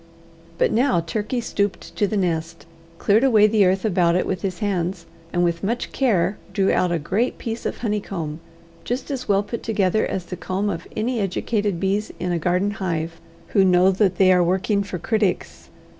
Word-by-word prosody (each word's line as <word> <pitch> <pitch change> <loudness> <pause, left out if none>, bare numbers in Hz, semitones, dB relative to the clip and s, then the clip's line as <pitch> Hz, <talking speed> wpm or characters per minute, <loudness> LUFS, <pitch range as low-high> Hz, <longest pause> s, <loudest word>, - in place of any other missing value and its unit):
But - - +2
now 240 -7 +3
Turkey 210 +8 -2
stooped 200 -4 -2
to 205 - +1
the 215 - -2
nest, 165 -4 -2 0.3
cleared 215 +4 +3
away 220 -6 +5
the 215 -1 +4
earth 190 +3 +1
about 175 -4 +2
it 180 - +1
with 185 -2 -2
his 185 -2 -3
hands, 185 -4 -2 0.3
and 175 - +1
with 170 0 0
much 235 +5 -2
care 205 -7 +1
drew 195 -1 +2
out 180 - +2
a 170 - +1
great 200 +11 -1
piece 230 -1 -4
of - - -4
honeycomb, 195 -8 -3 0.4
just 250 +4 -3
as 260 -5 -4
well 200 0 +3
put 220 +3 -5
together 210 -1 +1
as 185 -2 -3
the 180 - -6
comb 190 +4 -2
of 165 - -6
any 235 +2 0
educated 205 -1 -1
bees 195 +3 -1
in 180 0 -2
a 170 - 0
garden 180 +5 +1
hive, 165 -5 -3 0.3
who 195 - +4
know 185 0 +5
that 190 -1 +2
they 185 -1 +6
are 180 -1 +4
working 190 +4 +1
for 195 -2 -4
critics. 205 0 -1
195 Hz, 190 wpm, -22 LUFS, 180-215 Hz, 0.4 s, they